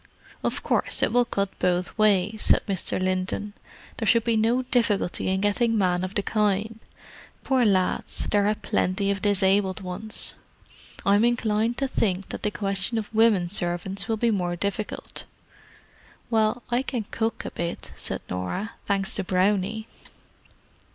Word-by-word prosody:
"Of - - -1
course, - - +1
it - - +2
will 245 0 +4
cut 200 -3 -1
both 180 0 0
ways," 210 -1 +3 0.2
Mr. 190 -2 -1
Linton 185 +2 -1
said. - - -23
"There 220 - -2
should 230 +2 +4
be 230 -1 +1
no 230 +4 +2
difficulty 230 -7 +1
in 190 0 +1
getting 225 +3 +2
men 180 -2 +1
of 185 +1 -5
the 205 - 0
kind—poor 220 +5 -2
lads, 190 -4 +1
there 205 -1 +3
are 210 - +2
plenty 195 0 0
of 200 -1 -3
disabled 195 -1 +2
ones. 190 +4 -3 0.7
I'm 205 +2 +4
inclined 235 -1 +1
to 275 - 0
think 195 -7 -1
that - - -5
the 210 - +1
question 200 +2 0
of 220 0 -4
women 215 -5 +4
servants 180 +2 -2
will 225 -1 0
be 235 +1 +2
more 180 -4 -1
difficult." 200 +3 -4 1.1
"Well, 220 +2 +2
I 240 +1 +2
can 250 -4 -3
cook 225 0 -2
a - - -4
bit," 170 0 -5
said - - -4
Norah—"thanks 195 - -3
to 195 - -1
Brownie." 195 +3 +1
205 Hz, 150 wpm, -25 LUFS, 190-225 Hz, 1.1 s, will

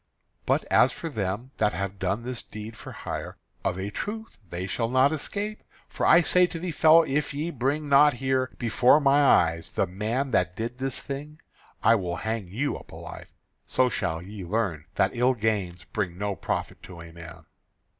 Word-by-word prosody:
But - - +2
as - - +5
for 170 -5 -6
them 105 +3 -3
that 105 -1 +2
have 100 0 -4
done 100 +5 -1
this 125 -1 -4
deed 110 +2 -9
for - - -10
hire, - - -6 0.3
of 90 -2 -1
a 95 +2 -4
truth 220 - -6
they 85 +2 -4
shall 115 +4 -2
not 130 +3 +4
escape, 205 +7 -4 0.3
for - - -1
I 170 - +7
say 180 +1 +4
to 175 - -6
thee, 175 +1 -3
fellow, 160 +1 +6
if 145 -1 -1
ye 155 +4 -2
bring 145 +3 -1
not 145 0 +6
here 130 0 0
before 120 +4 +4
my 140 0 +4
eyes 85 - +3
the - - +1
man 110 +9 -2
that 90 -5 +1
did 120 +3 -4
this 135 -1 -2
thing, 150 +3 -6 0.4
I 115 - +6
will 90 -6 -1
hang 110 +2 -3
you 125 +11 -2
up - - -16
alive. - - -10 0.4
So 130 -1 +2
shall 85 -7 -2
ye 100 +1 -8
learn 90 -5 -1
that 95 - +2
ill 125 +2 +3
gains 100 -6 -1
bring 90 -5 -3
no 100 0 -2
profit - - -3
to 90 -2 -11
a 85 0 -11
man." 85 0 -11
115 Hz, 190 wpm, -26 LUFS, 95-140 Hz, 0.4 s, I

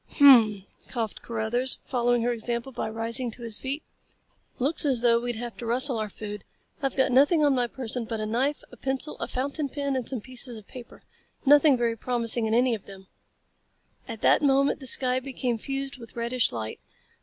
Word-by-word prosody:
"Hum 285 - +6
m 260 -4 +10
m!" 195 -1 -16 0.2
coughed 225 -4 -4
Carruthers, 235 +3 -2
following 245 -2 +1
her 245 +1 +1
example 235 +2 -4
by 240 - -4
rising 230 +3 -2
to 235 +1 -10
his 225 -2 -2
feet. 275 +3 -4 0.7
"Looks 285 +6 +3
as 265 -5 +2
though 235 -1 +4
we'd 240 0 -3
have 240 +1 -6
to 240 - -7
rustle 250 +1 +4
our 215 -1 -3
food. 210 0 -8 0.4
I've 270 -2 -1
got 265 0 +2
nothing 290 +5 +4
on 285 - +4
my 245 -2 +1
person 245 -1 -4
but 225 0 -4
a 215 - -2
knife, 255 +7 -1
a - - -13
pencil, 270 +3 -2
a - - -3
fountain 280 +3 -3
pen 280 0 -2
and 255 -3 -2
some 260 - -3
pieces 250 0 -2
of 215 - -13
paper. 245 +1 -12 0.4
Nothing 290 0 +6
very 235 -1 0
promising 235 -1 0
in 220 - +1
any 250 0 +3
of 215 -4 -5
them." 190 -1 -13 1.0
At - - -7
that - - +4
moment 275 -1 +2
the 265 - -6
sky 255 +1 +3
became 255 -3 -3
fused 275 +2 -4
with 230 -1 -13
reddish 235 +1 0
light. 110 -2 -6
245 Hz, 200 wpm, -26 LUFS, 230-270 Hz, 1.0 s, m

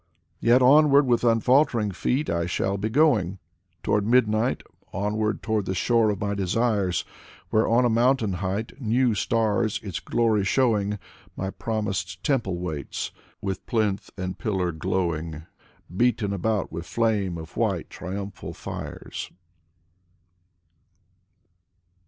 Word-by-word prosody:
• - - -44 0.4
Yet 120 +2 +4
onward 145 +1 +6
with 120 -2 +2
unfaltering 115 -1 +3
feet 130 - -1
I 85 0 0
shall 95 +2 -1
be 100 +2 -2
going 110 - +3 0.5
Toward 105 - +2
midnight, 115 0 +2 0.3
onward 105 +2 -1
toward 110 -3 0
the 95 - -1
shore 115 +3 +3
of 100 -3 -1
my 100 0 -1
desires. 100 -1 0 0.5
Where 110 - +3
on 120 +2 +4
a - - +3
mountain 120 -3 +2
height, 100 +7 -3
new 120 +1 +2
stars 110 +1 +1
its 95 -5 -4
glory 110 -4 +1
showing. 105 -1 +1 0.4
My 95 0 -3
promised 95 -6 -3
temple 115 -10 0
waits, 80 -6 -4 0.3
with 95 -2 -3
plinth 105 -4 0
and 90 -1 -4
pillar 90 -2 0
glow 90 +1 -1
ing. 80 0 -6 0.5
Beaten 115 -2 +1
about 100 +1 -1
with 85 +1 -6
flame 105 -6 0
of 80 0 -9
white, - - -1
triumphal 100 +2 -6
fires. - - -6
105 Hz, 130 wpm, -25 LUFS, 95-115 Hz, 0.5 s, onward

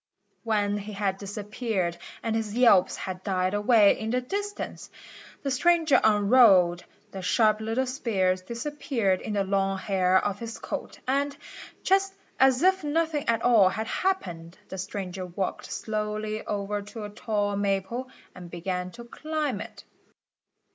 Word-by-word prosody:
When 205 -2 0
he 205 +1 -7
had 195 -1 -1
disappeared 205 -2 -3 0.3
and 225 -1 -1
his 220 -1 -2
yelps 230 -7 +5
had 185 -1 -6
died 185 -1 0
away 210 0 +4
in 220 - -3
the 250 +2 +1
distance, 405 +11 -5 0.5
the 275 - -1
stranger 325 +2 +4
unrolled, 205 -5 +5 0.3
the 190 - -6
sharp 215 +3 +3
little 225 +4 0
spears 195 -8 0
disappeared 235 -3 -2
in 215 - -4
the 200 -1 +1
long 195 0 0
hair 185 -1 +2
of 205 -1 -2
his 230 -1 -6
coat - - -6
and, 280 +2 0 0.5
just 390 0 +2 0.2
as 265 +2 +4
if 380 -1 +3
nothing 305 -1 0
at 230 0 +1
all 220 -6 +6
had 220 +3 -3
happened, 180 - -2
the 190 - -6
stranger 190 -1 -5
walked 180 +2 -4
slowly 215 0 -3
over 205 0 -2
to 210 +2 -8
a 205 - -5
tall 205 -2 -1
maple 200 +6 -1 0.2
and 180 -1 -10
began 180 +1 -3
to 235 - -9
climb 300 -2 -3
it. - - -10
210 Hz, 150 wpm, -27 LUFS, 195-250 Hz, 0.5 s, all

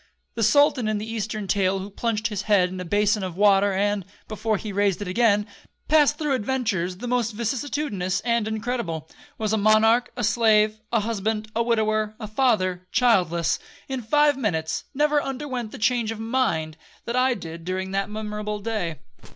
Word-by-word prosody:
The 230 - -4
sultan 255 +1 +4
in 215 -1 0
the 210 - -4
eastern 215 -2 -4
tale 195 -1 +1
who 195 +2 -6
plunged 225 +1 -1
his 210 -2 -3
head 185 -3 +4
in 185 0 -7
a 180 - -5
bason 205 +4 +2
of 185 -2 -5
water, 200 0 +4
and, 200 +1 0 0.2
before 215 0 -1
he 210 0 -6
raised 200 -2 +1
it 205 - -5
again, 210 +1 +2 0.4
passed 295 -1 +4
through 300 -3 0
adventures 210 -8 -1
the 245 +5 -6
most 240 -2 0
vicissitudinous 235 -5 -2
and 235 -2 +1
incredible—was 220 - -4
a - - +3
monarch, 220 +3 +4
a - - -2
slave, 215 -1 +3
a 230 -2 +2
husband, 215 0 -2
a 230 - +2
widower, 215 -2 +1
a 220 - -5
father, 205 -6 0
childless,—in 195 - 0
five 295 +5 +3
minutes, 160 -10 -2
never 295 +1 +3
underwent 260 -5 -4
the - - -8
changes 225 0 +1
of - - -11
mind 220 -10 -1 0.3
that 235 - -3
I 255 0 +3
did 165 -4 -8
during 190 +2 -3
that 195 +1 -1
memorable 210 0 -4
day. 200 -7 -3
215 Hz, 170 wpm, -24 LUFS, 195-235 Hz, 0.4 s, sultan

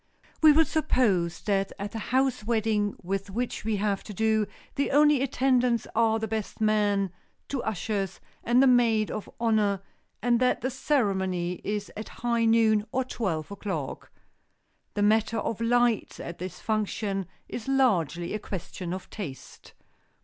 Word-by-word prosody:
We 310 -1 +9
will 320 +2 +5
suppose 210 - +1
that 195 -2 0
at 200 0 -5
the 225 - -4
house 260 -2 +1
wedding 215 -2 0
with 195 +2 -3
which 240 +5 -3
we 220 0 0
have 200 -1 -1
to 210 - -8
do 220 0 +2 0.3
the 280 - 0
only 295 -1 +5
attendants 250 -3 +2
are 225 -1 +3
the 220 0 -3
best 220 -1 -4
man, 205 -3 +2 0.4
two 275 -3 -2
ushers 200 -2 -2 0.2
and 245 +3 +4
the - - +6
maid 235 -4 +4
of 215 - -5
honor, 210 -4 +2 0.4
and 240 +1 +2
that 250 0 +2
the 260 - -1
ceremony 190 -10 0
is 205 0 -3
at 215 - -6 0.2
high 235 -1 +2
noon, 225 -2 +4
or 260 - +1
twelve 185 - -3
o'clock. 190 -9 -5 0.9
The 205 - +1
matter 220 +1 +3
of 225 0 -2
lights 240 -1 +2
at 170 - -7
this 180 0 -6
function 210 -3 -1 0.2
is 230 - -6
largely 180 - +1
a 215 - -2
question 185 -2 -5
of 185 - -8
taste. 155 -11 -9
215 Hz, 155 wpm, -27 LUFS, 195-240 Hz, 0.9 s, We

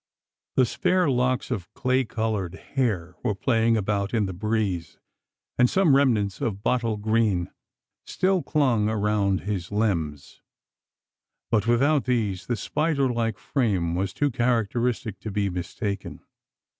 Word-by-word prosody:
The 130 - +5
spare 180 +4 +1
locks 125 0 0
of 100 -8 -4
clay 130 +1 +1
coloured 110 -5 -2
hair 100 -9 -2
were 110 -5 0
playing 115 +1 +2
about 100 +1 -1
in 110 -3 +2
the 95 - -4
breeze; 100 -4 -2 0.6
and 125 -1 +5
some 180 -8 +4
remnants 110 -8 +2
of 100 -2 -2
bottle 115 -3 +1
green 105 -4 +1 0.5
still 185 -1 +1
clung 125 -10 +1
around 105 -3 +1
his 95 -3 -4
limbs. 85 -10 -2 1.1
But 110 -1 +2
without 135 +5 +3
these, 110 -7 -1
the 120 - 0
spider 140 +3 0
like 115 -3 -1
frame 95 - 0
was 95 +2 -1
too 145 -1 0
characteristic 120 -3 0
to 110 - -6
be 100 -1 -1
mistaken. 100 +3 -4
110 Hz, 130 wpm, -25 LUFS, 100-125 Hz, 1.1 s, The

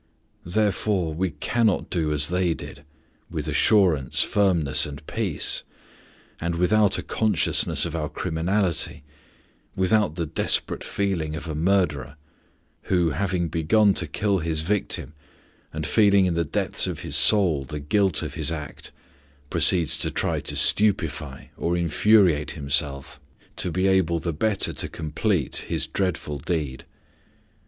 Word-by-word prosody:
Therefore, 100 -3 0
we 90 +4 -1
cannot 105 +8 -1
do 80 -4 -1
as 75 0 +1
they 90 -2 0
did, 70 - -10 0.5
with 80 -3 -4
assurance, 75 - +3
firmness, 85 -9 +1
and 70 0 -10
peace, 105 -6 0 0.8
and 85 0 -2
without 100 +3 +2
a - - -5
consciousness 105 -8 0
of 85 -1 -5
our 75 -2 -3
criminality, 85 +1 -2 0.7
without 95 -3 +1
the 85 -2 -2
desperate 80 - 0
feeling 90 -6 -2
of 80 - -7
a 80 - -4
murderer, 80 -5 0 0.7
who, 90 -4 +1
having 90 +2 -1
begun 95 +7 +2
to 85 -3 -2
kill 100 +5 0
his 80 -1 -2
victim, 95 -4 -1 0.6
and 80 0 -5
feeling 100 -1 +4
in 90 - 0
the 85 0 0
depths - - -1
of - - -5
his - - -1
soul 90 -10 +4
the 75 +3 -7
guilt 95 +3 0
of - - -5
his 80 -2 -1
act, 75 -3 -7 0.6
proceeds 85 -5 +3
to - - 0
try - - -1
to - - -4
stupefy 80 -9 +1
or 85 +1 -1
infuriate 85 -2 +3
himself, 70 -1 -2 0.4
to 90 - -2
be 95 +3 0
able 95 -3 +2
the 85 0 -3
better 100 +5 0
to - - -1
complete 80 - -1
his - - -1
dreadful 85 -6 -3
deed. 75 -4 -3
85 Hz, 140 wpm, -24 LUFS, 75-95 Hz, 0.8 s, feeling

